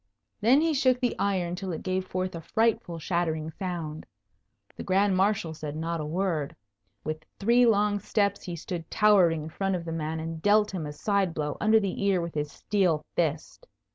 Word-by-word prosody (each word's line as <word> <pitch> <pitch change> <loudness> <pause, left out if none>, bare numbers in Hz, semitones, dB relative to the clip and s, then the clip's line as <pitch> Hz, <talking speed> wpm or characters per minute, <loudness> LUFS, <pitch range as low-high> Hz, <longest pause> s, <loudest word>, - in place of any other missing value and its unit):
Then 255 +7 +5
he 325 0 +2
shook 255 -3 +3
the 245 -2 0
iron 185 -4 0
till 185 +1 -4
it 160 - -5
gave 185 0 -1
forth 185 0 -2
a 165 - -6
frightful 220 -2 0
shattering 160 -2 -1
sound. 165 -3 -5 0.7
The - - -7
Grand 195 +1 +2
Marshal 190 -4 +1
said 150 -1 -6
not 165 +1 -2
a - - -4
word. 165 -3 -1 0.5
With 155 0 -4
three 235 +4 +4
long 205 -2 +3
steps 200 0 0
he 175 - -5
stood 165 0 -6
towering 185 -7 +4
in 155 - -6
front 195 +3 -1
of 170 -2 -4
the 165 - -4
man 160 0 -3
and 160 0 -5
dealt 210 +2 +4
him 165 -5 -3
a - - -5
side 190 +3 0
blow 150 -1 -2
under 220 +1 +5
the 200 -1 -3
ear 195 -2 +3
with 170 -1 -4
his 150 -1 -2
steel 180 -7 0
fist. 160 -2 -2
180 Hz, 195 wpm, -27 LUFS, 160-200 Hz, 0.7 s, Then